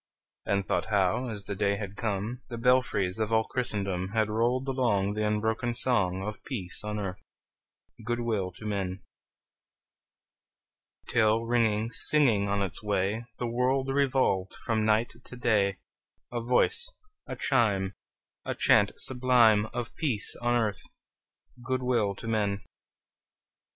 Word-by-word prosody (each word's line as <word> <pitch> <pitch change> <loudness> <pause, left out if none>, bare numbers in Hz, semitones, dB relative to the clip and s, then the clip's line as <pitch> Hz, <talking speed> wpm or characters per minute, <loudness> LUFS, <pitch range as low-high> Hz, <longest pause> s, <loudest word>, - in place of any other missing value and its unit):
And 100 -1 +1
thought - - 0
how, 105 +4 +1
as 105 -3 -4
the 100 - -3
day 100 0 +1
had 100 -1 -6
come, 110 +3 -3
The 120 - -5
belfries 115 -6 +2
of 110 0 -1
all 110 0 +4
Christendom 100 -6 -2
Had 110 -1 +1
rolled 120 +4 +1
along 110 -7 +1
The 105 0 0
unbroken 110 +3 0
song 95 -7 +1
Of 105 +1 -6
peace 100 -11 -3
on 105 0 -3
earth, 95 -3 -4 0.8
good 120 +2 -2
will 105 -6 -1
to 110 - -11
men! 95 -3 -3 2.0
Till, 110 -1 +3
ringing, 115 -2 +1
singing 120 -12 +3
on 100 0 +1
its 90 -5 -5
way, 105 +2 -1
The 120 - -3
world 130 +3 0
revolved 130 -9 +1
from 110 -3 +1
night 110 +2 +2
to - - -10
day, 105 -5 +1 0.5
A 120 -1 -2
voice, 125 - +1 0.4
a - - -5
chime, 105 -7 +1 0.5
A - - -3
chant - - +4
sublime 120 -5 +3
Of 120 +1 -5
peace 130 -10 +1
on 120 0 +2
earth, 110 -4 0 0.8
good 130 +1 -1
will 115 -6 +1
to 115 - -9
men! 100 -3 0
110 Hz, 140 wpm, -28 LUFS, 100-120 Hz, 2.0 s, all